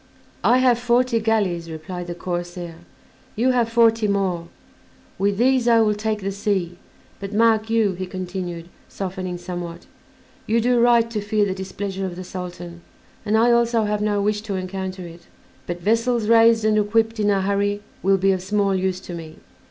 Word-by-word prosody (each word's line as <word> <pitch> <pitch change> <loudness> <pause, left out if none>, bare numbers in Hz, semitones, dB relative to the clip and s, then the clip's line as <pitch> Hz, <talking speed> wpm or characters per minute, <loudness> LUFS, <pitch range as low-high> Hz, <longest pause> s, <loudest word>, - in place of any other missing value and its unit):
"I 245 - +5
have 250 -2 +3
forty 245 0 +2
galleys," 200 -7 0
replied 175 +3 -7
the 175 - -5
corsair; 175 -1 -5 0.6
"you 245 +4 +2
have 240 -2 +1
forty 230 -1 +3
more. 190 -4 -1 0.7
With 200 0 +1
these 250 +1 +3
I 230 -1 +5
will 215 -1 +3
take 215 0 -2
the 195 +1 -2
sea; 190 -3 -2 0.4
but, 200 +1 -6
mark 220 0 +3
you," 225 -3 +2
he 185 +1 -5
continued, 180 -2 -5 0.2
softening 185 -2 -5
somewhat, 175 -1 -7 0.6
"you 225 +2 +2
do 245 +1 +2
right 235 -1 +4
to 215 -2 -2
fear 210 0 +1
the 190 - -1
displeasure 190 0 -4
of 175 - -7
the 185 - -7
Sultan, 175 -1 -8 0.5
and 215 +1 +3
I 235 +2 +4
also 235 -1 +3
have 210 0 -1
no 205 -1 0
wish 210 0 0
to 210 -2 -4
encounter 185 0 -5
it; 170 0 -13 0.4
but 175 0 -4
vessels 230 +3 +1
raised 225 -1 +5
and 215 0 +3
equipped 225 +2 +1
in 210 -1 +2
a 195 -1 +2
hurry 200 +1 0 0.2
will 195 +1 +3
be 195 +1 +2
of 190 -1 -1
small 200 +1 0
use 185 -1 -1
to 180 - -8
me. 160 -2 -8
200 Hz, 180 wpm, -22 LUFS, 185-225 Hz, 0.7 s, I